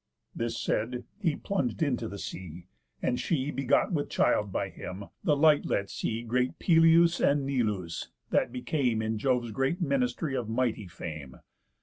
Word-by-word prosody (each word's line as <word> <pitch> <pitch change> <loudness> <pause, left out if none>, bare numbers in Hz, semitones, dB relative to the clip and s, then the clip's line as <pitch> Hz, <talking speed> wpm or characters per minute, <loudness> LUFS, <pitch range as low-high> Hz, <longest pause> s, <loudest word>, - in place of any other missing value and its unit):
This 115 0 -2
said, 125 +3 -1 0.2
he 165 -8 +1
plung'd 160 - -1
into 125 -6 0
the 100 - -7
sea; 85 -3 -7 0.4
and 125 - +1
she, 145 0 0
Begot 135 - +2
with 145 -3 -1
child 105 -2 +2
by 100 +1 -1
him, 95 +2 -7 0.2
the 150 -2 +3
light 150 0 +5
let 100 0 -1
see 115 +1 -2
Great 125 +2 0
Pelias, 165 0 +5
and 140 -1 +3
Neleus, 105 -11 -1 0.2
that - - +2
became 125 -3 0
In 110 0 -1
Jove's 125 -2 +1
great 135 - 0
ministry 190 - 0
of 120 -4 -2
mighty 115 -3 0
fame. 75 -6 -7
125 Hz, 155 wpm, -29 LUFS, 110-145 Hz, 0.4 s, light